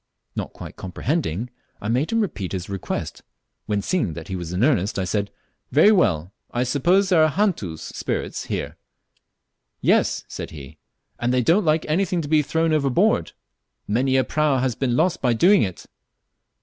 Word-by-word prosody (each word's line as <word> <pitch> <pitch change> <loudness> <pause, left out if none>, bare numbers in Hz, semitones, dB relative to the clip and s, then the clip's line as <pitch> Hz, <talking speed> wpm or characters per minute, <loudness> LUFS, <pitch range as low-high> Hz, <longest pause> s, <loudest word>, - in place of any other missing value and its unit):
Not - - -4
quite - - -10
comprehending, 115 - -2 0.3
I 105 - -5
made 125 - 0
him 230 0 +2
repeat 105 - -3
his 90 0 -4
request, 100 -2 -4 0.5
when, 105 -2 0
seeing 110 - 0
he 95 - -5
was 85 -2 -5
in 90 +5 0
earnest, 110 -10 +2
I 95 - 0
said, 100 +2 -1 0.4
"Very 160 +9 +6
well, 95 - +2 0.2
I 120 - -1
suppose 175 +9 +2
there 170 -4 +5
are 155 - +4
'hantus' 150 - -1
(spirits) - - -4
here." - - -4 1.0
"Yes," - - +2
said - - -6
he, 75 0 -11 0.4
"and 120 +1 0
they 125 0 +2
don't 180 - +3
like 155 0 +2
anything 175 +3 +1
to - - -5
be 155 0 +4
thrown 160 +2 0
overboard; 140 -4 +2 0.5
many 130 +5 +2
a 130 - +4
prau 150 -1 +1
has 130 -1 0
been 120 +1 -1
lost 170 +5 +1
by 125 -3 +2
doing 185 - +5
it." 95 -4 -3
130 Hz, 170 wpm, -23 LUFS, 100-160 Hz, 1.0 s, Very